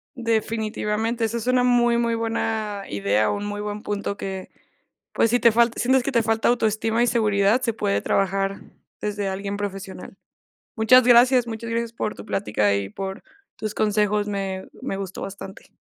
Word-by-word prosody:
Definitivamente, 225 -1 -1
eso 225 +1 -2
es 235 +1 -5
una 255 0 +3
muy 240 -1 +3
muy 235 -1 +1
buena 220 -2 -2
idea, 100 +1 +1
un 205 0 -2
muy 205 0 -4
buen 210 0 -5
punto 200 -1 -3
que, 190 -2 -6 0.6
pues, 230 - +2
si 245 - +3
te 235 - +5
falta 235 +1 +3
si - - +1
sientes 260 +1 +3
que 275 - -2
te 235 -3 +3
falta 225 0 +1
autoestima 225 -1 +1
y 240 - +3
seguridad, 210 0 +2
se 230 -2 0
puede 205 -2 0
trabajar 195 0 0 0.4
desde 205 -1 -2
alguien 200 +1 -4
profesional. 195 -1 -6 0.6
Muchas 240 +4 +6
gracias 245 +1 +6
muchas 230 0 -5
gracias 230 0 -2
por 215 -2 -3
tu - - -10
plática, 105 - 0
y 100 -1 -2
por 190 - -6 0.3
tus 215 -1 -4
consejos, 210 -1 +1
me 195 -2 -3
me 255 -6 -3
gustó 195 -1 -6
bastante. 195 0 -9
215 Hz, 175 wpm, -23 LUFS, 200-235 Hz, 0.6 s, Muchas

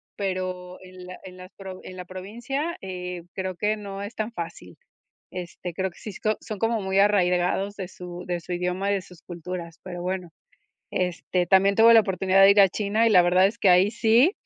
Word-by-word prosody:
pero 185 -2 -4
en 185 0 -12
la 180 0 -10
en 185 -1 -11
las 185 +1 -12 0.3
en 185 - -9
la 180 - -7
provincia, 235 - -4
eh, 180 -2 -6
creo 190 -1 -3
que 210 +4 0
no 200 -1 -7
es 205 +3 -7
tan 220 +2 -3
fácil. 170 - -8 0.5
Este, 180 -1 -7
creo 190 0 -2
que - - -20
si 210 - -8
so 215 +3 -1
son 210 -3 -7
como 225 0 +1
muy 190 0 +1
arraigados 195 0 +2
de 190 -3 -6
su 180 -1 -9
de 175 -1 -1
su 175 +2 -8
idioma 180 +3 -1
y - - +2
de 195 - -2
sus 180 -2 -16
culturas, 170 -1 -7
pero 175 -2 -7
bueno. 180 -1 -3 0.6
Este, 180 0 -1
también 195 +1 +4
tuve 230 +1 +7
la 225 - +9
oportunidad 190 -1 +2
de 195 - +8
ir 200 0 +6
a 195 - +7
China, 215 +4 0
y - - +4
la 180 -3 +7
verdad 180 +2 +4
es 205 - -3
que 195 - +3
ahí 185 +4 +5
sí, 235 - +4
185 Hz, 210 wpm, -25 LUFS, 180-205 Hz, 0.6 s, la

